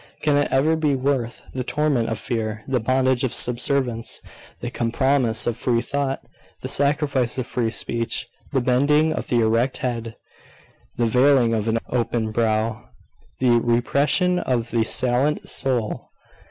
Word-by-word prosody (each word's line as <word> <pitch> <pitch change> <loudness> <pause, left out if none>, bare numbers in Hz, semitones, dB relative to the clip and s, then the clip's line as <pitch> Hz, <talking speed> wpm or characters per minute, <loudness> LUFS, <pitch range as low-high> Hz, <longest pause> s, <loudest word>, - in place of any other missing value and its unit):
Can 150 -1 +3
it 145 0 +1
ever 150 +5 +3
be 150 -3 +1
worth 130 -3 -1
the 130 - -3
torment 140 -4 0
of 115 - -2
fear, 110 -1 -3
the 130 -2 +1
bondage 130 +2 +1
of 125 -2 -1
subservience? 125 -1 0 0.4
the - - -5
compromise 120 0 +1
of 120 - 0
free 120 -1 +1
thought, 140 -1 -2 0.4
the - - -2
sacrifice 140 -3 +1
of 130 - -2
free 120 -3 -1
speech, 115 0 -2 0.2
the 135 - +1
bending 145 +5 +3
of - - -4
the 120 -1 +2
erect 115 +4 +1
head, 115 -3 -4 0.8
the 120 - +2
veiling 125 0 +4
of 110 -2 0
the 115 0 +1
open 115 -2 -1
brow, 110 0 0 0.5
the 120 -2 +4
repression 140 +10 +2
of 120 -6 -1
the 115 -1 +2
salient 130 +5 +1
soul? 125 -5 -2
125 Hz, 150 wpm, -22 LUFS, 115-140 Hz, 0.8 s, veiling